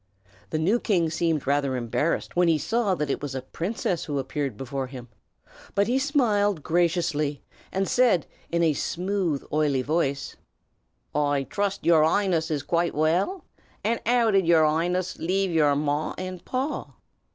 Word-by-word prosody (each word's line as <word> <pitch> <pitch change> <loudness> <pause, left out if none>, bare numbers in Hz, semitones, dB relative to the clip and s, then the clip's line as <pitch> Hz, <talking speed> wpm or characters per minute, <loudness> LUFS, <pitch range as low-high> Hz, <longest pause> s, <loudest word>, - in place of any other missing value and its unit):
The 155 - -1
new 190 +10 +2
king 175 -9 +1
seemed 160 -3 0
rather 140 -1 +1
embarrassed 125 +6 -1
when 175 0 +4
he 165 -2 +4
saw 220 +2 0
that 150 -4 -2
it - - -2
was 140 -2 -5
a 130 - -4
princess 175 - -3
who 145 -2 -3
appeared 135 -3 -3
before 135 +1 -4
him; 125 -2 -10 0.7
but 200 +1 +3
he 250 +4 +1
smiled 210 - +1
graciously, 165 -4 0 0.3
and 195 0 0
said, 225 - +3 0.2
in 170 0 +1
a 160 -2 +3
smooth 180 -1 -1
oily 145 -4 +2
voice, 140 -2 -1 0.8
"I 145 -1 +1
trust 200 +5 -2
your 165 -2 +5
'Ighness 170 -1 +1
is 150 -3 -1
quite 170 +3 0
well. 175 - +1 0.4
And 230 +2 +1
'ow 235 -2 +4
did 195 -4 +3
yer 165 -2 +6
'Ighness 175 +4 0
leave 190 +2 0
yer 150 -3 +3
pa 150 +1 -1
and 185 -1 -5
ma?" 265 +4 -2
165 Hz, 160 wpm, -25 LUFS, 145-195 Hz, 0.8 s, yer